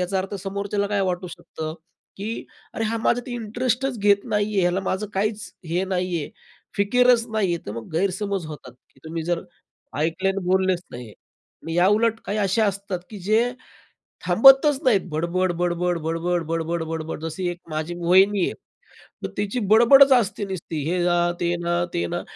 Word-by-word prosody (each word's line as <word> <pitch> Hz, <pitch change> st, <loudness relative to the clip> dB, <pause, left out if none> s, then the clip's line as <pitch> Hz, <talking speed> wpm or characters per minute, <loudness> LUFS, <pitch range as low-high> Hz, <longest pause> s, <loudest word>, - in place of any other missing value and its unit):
याचा 185 Hz, +2 st, -1 dB
अर्थ 195 Hz, +2 st, -4 dB
समोरच्याला 200 Hz, +1 st, -2 dB
काय 205 Hz, -1 st, 0 dB
वाटू 180 Hz, 0 st, -3 dB
शकतं, 160 Hz, -2 st, -7 dB, 0.4 s
की 200 Hz, +3 st, -5 dB, 0.5 s
अरे 225 Hz, -, -2 dB
हा 225 Hz, +1 st, -1 dB
माझात 245 Hz, +1 st, +1 dB
इंटरेस्टच 245 Hz, +2 st, -2 dB
घेत 200 Hz, 0 st, +3 dB
नाहीये, 210 Hz, -2 st, 0 dB
याला 180 Hz, +2 st, +1 dB
माझं 190 Hz, +2 st, -2 dB
काहीच 210 Hz, +2 st, -1 dB, 0.2 s
हे 175 Hz, +4 st, 0 dB
नाही 180 Hz, -2 st, -1 dB
आहे. -, -, -8 dB, 0.5 s
फिकीरच 240 Hz, +3 st, +3 dB
नाहीये. 195 Hz, -6 st, 0 dB
तर 105 Hz, -, -4 dB
मग 115 Hz, +4 st, -8 dB
गैरसमज 195 Hz, 0 st, -1 dB
होतात. 155 Hz, -1 st, -10 dB, 0.2 s
की 135 Hz, -, -26 dB
तुम्ही 160 Hz, +1 st, -4 dB
जर 175 Hz, 0 st, -1 dB, 0.6 s
ऐकले 165 Hz, +5 st, 0 dB
आणि 195 Hz, -1 st, -2 dB
बोललेच 185 Hz, -1 st, +2 dB
नाहीये 120 Hz, -3 st, -9 dB
आणि 165 Hz, 0 st, -12 dB
याउलट 215 Hz, +5 st, +3 dB
काही 210 Hz, +1 st, -2 dB
अशा 205 Hz, +2 st, +2 dB
असतात, 200 Hz, -1 st, -3 dB
की 210 Hz, -, -8 dB
जे 220 Hz, +6 st, +1 dB, 0.7 s
थांबतच 270 Hz, -, +6 dB
नाहीत 225 Hz, -7 st, +4 dB
बडबड-बडबड, 175 Hz, +1 st, 0 dB
बडबड-बडबड, 165 Hz, 0 st, -1 dB
बडबड. 160 Hz, -1 st, -5 dB
जशी 165 Hz, +3 st, -3 dB
एक 175 Hz, -, -8 dB
माझी 155 Hz, +2 st, -3 dB
वहिनी 190 Hz, +3 st, +4 dB
आहे. -, -, -3 dB, 0.7 s
मग -, -, -2 dB
तिची 205 Hz, +4 st, -1 dB
बडबडच 270 Hz, +5 st, +7 dB
असते 215 Hz, -4 st, +1 dB
नुसती. 175 Hz, -4 st, -5 dB
हे 180 Hz, -, 0 dB
ना, 175 Hz, 0 st, +2 dB, 0.2 s
ते 175 Hz, 0 st, 0 dB
ना, 170 Hz, -, 0 dB, 0.2 s
ते 85 Hz, -, 0 dB
ना -, -, -2 dB
190 Hz, 160 wpm, -23 LUFS, 170-210 Hz, 0.7 s, बडबडच